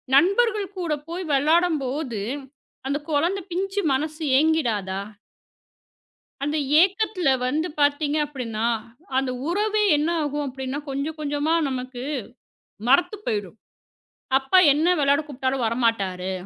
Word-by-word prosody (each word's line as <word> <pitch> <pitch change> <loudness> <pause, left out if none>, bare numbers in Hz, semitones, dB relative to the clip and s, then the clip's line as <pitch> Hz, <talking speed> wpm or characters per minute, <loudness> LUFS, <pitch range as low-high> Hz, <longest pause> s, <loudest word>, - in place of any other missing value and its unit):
நண்பர்கள் 400 +4 +3
கூடப் 300 -4 -2
போய் 355 +2 -4
விளையாடும்போது 290 - +1 0.7
அந்தக் 290 +2 -3
குழந்த 335 +7 +1
பிஞ்சு 390 +3 -1
மனசு 310 +3 -2
ஏங்கிடாதா? 230 -12 +1 1.4
அந்த 295 +2 -1 0.3
ஏக்கத்துல 380 -3 +1 0.2
வந்து 310 +7 0
பார்த்தீங்க 290 +1 +2
அப்படின்னா, 230 -6 -3 0.5
அந்த 270 -1 0 0.2
உறவே 420 +4 +1
என்ன 300 +3 0
ஆகும் 290 0 -2
அப்படின்னா, 265 +1 -4
கொஞ்சம் 295 +4 -3
கொஞ்சமா 295 +2 0
நமக்கு 255 -1 -5 0.9
மறத்து 355 +10 +4
போயிடும். 205 -1 -3 0.8
அப்பா 275 +8 +4
என்ன 310 +4 +1
விளையாட 285 +1 +3
கூப்பிட்டாலும் 265 -3 -2
வரமாட்டாரு. 200 -6 0
290 Hz, 105 wpm, -24 LUFS, 260-335 Hz, 1.4 s, மறத்து